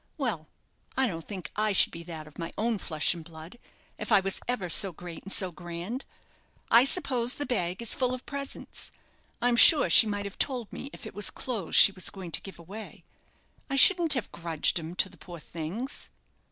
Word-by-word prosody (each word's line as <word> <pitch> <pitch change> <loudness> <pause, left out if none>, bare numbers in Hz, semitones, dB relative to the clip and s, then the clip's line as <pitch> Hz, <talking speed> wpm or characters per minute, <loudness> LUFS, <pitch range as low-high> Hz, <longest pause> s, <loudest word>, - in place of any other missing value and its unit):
Well, 220 - -3 0.5
I 265 - +4
don't 165 -8 -5
think 190 -4 -7
I 215 -1 +1
should - - +4
be 165 - -7
that 160 -3 -8
of 150 - -15
my 165 0 -5
own 225 -1 -1
flesh 155 -2 +1
and 170 -2 -9
blood, 160 +7 -12 0.4
if - - -6
I - - +7
was 195 0 -1
ever 240 -7 -2
so 195 +3 +4
great 175 0 -10
and 195 - -9
so 185 -2 +2
grand. 175 +9 -7 0.7
I 235 +3 +7
suppose 255 -6 +1
the 290 - -3
bag 185 -4 -2
is 235 - -1
full 255 -1 0
of 255 0 -6
presents 280 -1 -6 0.5
I'm 245 -1 +3
sure 295 +6 +7
she 225 - +8
might 205 -1 -3
have 200 - -9
told 250 -6 -1
me 275 - -7
if - - -12
it 220 - -9
was 205 - +2
clothes 220 -10 -5
she 200 - +9
was 185 -1 +1
going 185 -4 -9
to 155 - -2
give 195 -4 -11
away; 195 +6 -11 0.7
I 275 - -1
shouldn't 335 +3 +6
have 250 - -4
grudged 165 0 0
'em 165 +2 -8
to 185 - +1
the 180 -1 -17
poor 175 +1 -11
things." 175 - -6
200 Hz, 205 wpm, -28 LUFS, 170-245 Hz, 0.7 s, she